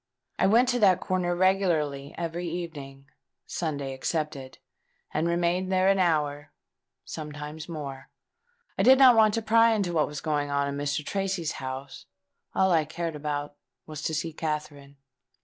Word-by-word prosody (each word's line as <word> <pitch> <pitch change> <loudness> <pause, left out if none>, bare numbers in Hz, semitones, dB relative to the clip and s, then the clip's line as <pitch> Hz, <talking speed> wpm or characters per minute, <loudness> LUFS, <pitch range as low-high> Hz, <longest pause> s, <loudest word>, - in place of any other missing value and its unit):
I - - +4
went 235 +5 +5
to 245 -1 +1
that 190 -4 +5
corner 180 -2 -1
regularly 165 -7 +1
every 170 +1 -3
evening, 145 -6 -7 0.4
Sunday 145 -5 -3
excepted; 140 -1 -3 0.6
and 155 +2 0
remained 175 +2 0
there 185 0 +3
an 195 0 +3
hour—sometimes 150 -1 -4
more. 140 -4 -7 0.7
I - - +4
did 265 +1 +7
not 260 -3 +8
want 215 -2 +5
to 230 - -2
pry 230 +1 +5
into 190 -5 -1
what 155 - +2
was 150 -1 -6
going 145 -2 -1
on 140 0 0
in 140 - -3
Mr. 145 +1 -2
Tracy's 195 -4 -2
house: 130 +1 -7 0.5
all 190 0 +3
I 160 -2 +4
cared 165 +1 -4
about 145 -1 -3 0.3
was 155 -1 -7
to 160 +1 -2
see 165 +1 -3
Katherine." 150 -3 -5
160 Hz, 150 wpm, -27 LUFS, 145-185 Hz, 0.7 s, not